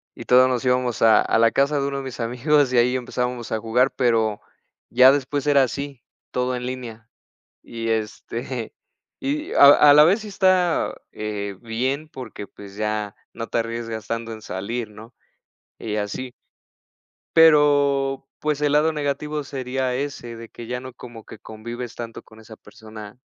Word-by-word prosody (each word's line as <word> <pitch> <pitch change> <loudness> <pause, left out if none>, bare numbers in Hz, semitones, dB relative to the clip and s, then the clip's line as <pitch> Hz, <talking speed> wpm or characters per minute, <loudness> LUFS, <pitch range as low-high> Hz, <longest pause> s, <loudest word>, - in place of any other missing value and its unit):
y - - -8
todos 125 +1 +5
nos 125 -2 -1
íbamos 125 -2 0
a 115 -1 +6
a - - +1
la 115 0 +5
casa 140 +3 +1
de 140 - -1
1 140 - -4
de 135 - -4
mis 130 -2 -7
amigos 130 +4 +2
y 125 - +1
ahí 125 +2 +3
empezábamos 125 -1 -3
a 110 - 0
jugar, 120 +4 +2
pero 115 -4 +1 0.5
ya 130 +2 +7
después 140 0 -1
era 140 -2 +5
así, 140 0 -5 0.3
todo 125 0 -1
en 125 0 -5
línea, 120 -3 -7 0.5
y 115 -1 -6
este 115 +2 -4 0.5
y 300 +3 -3
a - - +7 0.3
a - - +8
la 150 +1 +8
vez 190 +8 +3
sí 215 - -8
está, 185 -3 +2 0.2
eh, 100 -2 -5
bien 130 +6 -2
porque, 115 -7 -8
pues, 100 0 -13
ya 105 -1 -3 0.2
no 115 0 -6
te - - -3
arriesgas 115 -1 -4
tanto 115 0 -4
en 110 - -12
salir, 110 +5 -4
¿no? 110 +3 -14 0.7
Y 105 -2 -4
así. 105 +5 -4 1.0
Pero, 145 -4 +4
pues, 150 -1 -1
el 145 -1 +1
lado 150 +2 +3
negativo 150 0 -3
sería 130 -1 -3
ese, 130 -3 -5
de 115 0 -10
que 120 - -10
ya 125 +1 -4
no 130 0 -9
como 120 -2 -12
que - - -12
convives 120 +2 -8
tanto 115 -1 -8
con 110 0 -18
esa 110 0 -13
persona 110 0 -12
125 Hz, 170 wpm, -22 LUFS, 115-140 Hz, 1.0 s, a